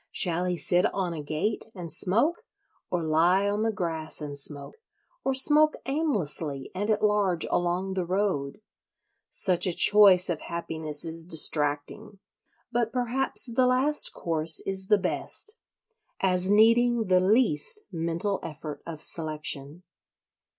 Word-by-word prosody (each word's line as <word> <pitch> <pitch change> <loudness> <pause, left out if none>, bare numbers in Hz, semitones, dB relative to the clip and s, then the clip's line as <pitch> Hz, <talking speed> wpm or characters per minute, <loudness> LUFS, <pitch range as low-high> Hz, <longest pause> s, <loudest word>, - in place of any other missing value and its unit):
Shall 175 0 0
he 180 -1 -2
sit 175 +1 +2
on 185 -3 -2
a 160 - -6
gate 155 +9 -3
and 170 -4 -7
smoke? 235 - 0 0.5
or 175 -2 -2
lie 170 +5 +2
on 205 +1 -1
the 225 0 0
grass 165 -5 -3
and 145 -2 -7
smoke? 140 - -5 0.5
or 270 - -1
smoke 300 +3 +5
aimlessly 175 - -2
and 205 +3 -4
at 215 -1 0
large 200 -5 +1
along 180 +2 -1
the 185 -1 -2
road? 185 -3 -2 0.7
Such 180 -1 +3
a 180 - +1
choice 190 0 +6
of 170 -3 -3
happiness 160 -2 -5
is 165 0 -6
distracting; 155 +5 -2 0.5
but 235 -1 -1
perhaps 250 +1 0
the 250 +1 +1
last 265 +4 +3
course 160 -1 +1
is 190 -1 -2
the 210 - +4
best—as 200 - -2
needing 230 +2 +3
the 185 -2 +3
least 205 - +2
mental 170 +4 -3
effort 155 -1 -8
of 160 -2 -6
selection. 155 0 -3
185 Hz, 135 wpm, -26 LUFS, 160-215 Hz, 0.7 s, choice